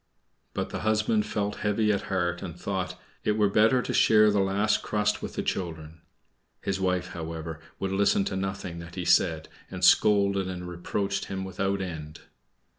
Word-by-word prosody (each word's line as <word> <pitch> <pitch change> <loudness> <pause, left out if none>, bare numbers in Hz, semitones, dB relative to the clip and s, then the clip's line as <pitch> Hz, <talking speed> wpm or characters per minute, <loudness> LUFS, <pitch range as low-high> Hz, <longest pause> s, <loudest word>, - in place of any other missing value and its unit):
But - - -2
her - - -3
husband 110 0 +1
felt 105 -1 -2
heavy 105 +1 +1
at 100 -1 0
heart, 90 -2 0
and 90 -2 -7
thought. 95 -2 -3 0.2
"It 105 - +2
were 105 -1 +2
better 110 +5 +4
to - - -3
share 110 -1 +5
the 105 - +2
last 100 +2 +2
crust 105 0 0
with - - -6
the - - -2
children." 80 -3 -4 0.6
His 95 0 -2
wife, 90 -1 0
however, 80 -2 -6 0.2
would 95 0 -2
listen 100 0 +3
to 95 - -2
nothing 95 -3 -4
that 85 0 -10
he 90 -2 -4
said, 85 -2 +3 0.2
and - - 0
scolded 100 -2 +4
and 90 -1 -5
reproached 100 +3 -2
him 95 0 -4
without 95 +1 -1
end. 80 -4 -6
95 Hz, 175 wpm, -27 LUFS, 90-105 Hz, 0.6 s, share